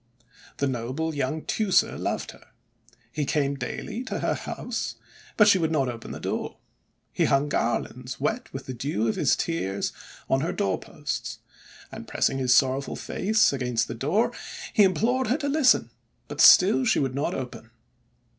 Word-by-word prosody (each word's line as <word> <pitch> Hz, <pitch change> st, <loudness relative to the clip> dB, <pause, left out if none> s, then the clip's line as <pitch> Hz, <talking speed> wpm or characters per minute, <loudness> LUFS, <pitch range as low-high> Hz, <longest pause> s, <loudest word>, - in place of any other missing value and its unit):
The 140 Hz, -, 0 dB
noble 130 Hz, +5 st, -2 dB
young 145 Hz, +2 st, -2 dB
Teucer 210 Hz, -4 st, +2 dB
loved -, -, -3 dB
her. -, -, -18 dB, 0.6 s
He 150 Hz, -, -2 dB
came 140 Hz, 0 st, 0 dB
daily 215 Hz, -, -5 dB
to -, -, -3 dB
her -, -, +1 dB
house, -, -, -4 dB, 0.4 s
but 210 Hz, -, +7 dB
she 200 Hz, -3 st, +6 dB
would 160 Hz, -2 st, 0 dB
not 135 Hz, -5 st, +1 dB
open 115 Hz, -2 st, -7 dB
the -, -, -6 dB
door. -, -, -4 dB, 0.6 s
He -, -, +2 dB
hung 140 Hz, +2 st, +2 dB
garlands 125 Hz, 0 st, -2 dB
wet 225 Hz, +3 st, -2 dB
with 135 Hz, 0 st, -7 dB
the 130 Hz, -, -5 dB
dew 120 Hz, -3 st, -1 dB
of 110 Hz, -, 0 dB
his -, -, +3 dB
tears 100 Hz, -, -2 dB, 0.3 s
on 135 Hz, -, +2 dB
her 165 Hz, -, -1 dB
doorposts, 95 Hz, -2 st, -3 dB, 0.5 s
and, -, -, -9 dB
pressing 135 Hz, -, 0 dB
his 130 Hz, -1 st, +1 dB
sorrowful 130 Hz, +2 st, +3 dB
face 215 Hz, -4 st, +1 dB
against 125 Hz, -3 st, 0 dB
the -, -, -5 dB
door, 150 Hz, -, +1 dB, 0.4 s
he 215 Hz, -, +4 dB
implored 230 Hz, +7 st, +2 dB
her 250 Hz, +6 st, +2 dB
to 290 Hz, -2 st, -3 dB
listen; 280 Hz, -2 st, +3 dB, 0.4 s
but -, -, -2 dB
still 205 Hz, +8 st, +7 dB
she 220 Hz, -3 st, +2 dB
would 135 Hz, -2 st, 0 dB
not 140 Hz, +3 st, -1 dB
open. 130 Hz, -2 st, -7 dB
140 Hz, 165 wpm, -26 LUFS, 130-200 Hz, 0.6 s, but